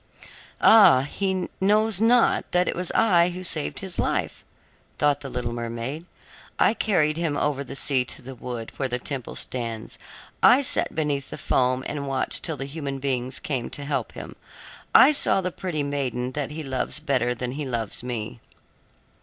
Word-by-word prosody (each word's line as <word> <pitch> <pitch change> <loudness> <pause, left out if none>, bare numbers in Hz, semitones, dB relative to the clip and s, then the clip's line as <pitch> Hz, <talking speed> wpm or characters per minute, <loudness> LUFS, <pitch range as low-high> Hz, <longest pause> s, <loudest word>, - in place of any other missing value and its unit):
"Ah, 195 -12 +7
he 185 +5 -2
knows 210 +1 +2
not 235 +1 +3
that 180 0 +3
it - - -1
was 180 0 -2
I 180 -6 +4
who 180 +1 -7
saved 155 -4 -2
his 190 -2 -5
life," - - -1 0.5
thought 145 -1 +2
the 135 - -7
little 125 -2 -3
mermaid. 120 +7 -5 0.5
"I - - +4
carried 160 -9 +1
him 165 -4 -1
over 145 -2 0
the 135 - -9
sea 135 -2 +1
to 130 - -7
the 135 +2 -8
wood 120 -2 -7
where 135 - -1
the 125 - 0
temple 130 -1 -5
stands; 115 -3 -5 0.4
I 270 +3 +6
sat - - +1
beneath 145 -3 -1
the - - -7
foam 130 0 +1
and 140 -1 -4
watched 135 -1 -1
till 160 -3 -3
the 135 - -4
human 140 -1 -5
beings 130 -1 -2
came 130 -5 -3
to 145 - -6
help 145 0 -2
him. - - -9 0.6
I 270 - +9
saw 280 -8 +4
the 185 -1 -2
pretty 165 -5 -3
maiden 130 -3 -2
that 145 0 -3
he 155 +1 -6
loves 135 +2 -2
better 130 -5 0
than 125 +1 -4
he 145 +2 -4
loves 115 -4 -3
me." 120 -1 -5
140 Hz, 180 wpm, -24 LUFS, 125-175 Hz, 0.6 s, I